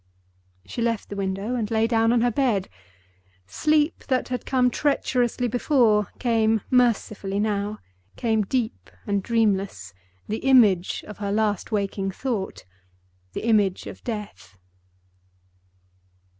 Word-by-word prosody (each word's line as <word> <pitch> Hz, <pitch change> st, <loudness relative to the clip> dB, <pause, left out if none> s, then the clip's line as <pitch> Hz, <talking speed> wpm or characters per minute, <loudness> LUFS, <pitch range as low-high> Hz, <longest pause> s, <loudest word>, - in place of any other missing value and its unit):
She 235 Hz, -, -5 dB
left 230 Hz, -2 st, -1 dB
the 205 Hz, -, -5 dB
window 195 Hz, +3 st, -2 dB
and 225 Hz, -4 st, -1 dB
lay 220 Hz, 0 st, +2 dB
down 225 Hz, -1 st, +2 dB
on 240 Hz, -1 st, +3 dB
her 245 Hz, 0 st, +2 dB
bed. 220 Hz, -6 st, 0 dB, 0.8 s
Sleep, 300 Hz, -, +1 dB
that 255 Hz, -2 st, 0 dB
had 250 Hz, -1 st, -4 dB
come 250 Hz, -2 st, +2 dB
treacherously 250 Hz, -4 st, 0 dB
before, 235 Hz, -, +2 dB
came 225 Hz, -3 st, +2 dB
mercifully 215 Hz, -5 st, +1 dB
now; 210 Hz, 0 st, -1 dB, 0.4 s
came 225 Hz, -2 st, +1 dB
deep 205 Hz, -, -2 dB, 0.2 s
and 200 Hz, -1 st, 0 dB
dreamless, 195 Hz, -, 0 dB, 0.3 s
the 215 Hz, -, -2 dB
image 215 Hz, -9 st, +4 dB
of 210 Hz, -, -10 dB
her 200 Hz, -1 st, -2 dB
last 210 Hz, -1 st, 0 dB
waking 200 Hz, -2 st, -1 dB
thought—the 95 Hz, -, -7 dB
image 205 Hz, -5 st, +2 dB
of -, -, -9 dB
Death. 210 Hz, -, -7 dB
215 Hz, 120 wpm, -24 LUFS, 195-240 Hz, 0.8 s, image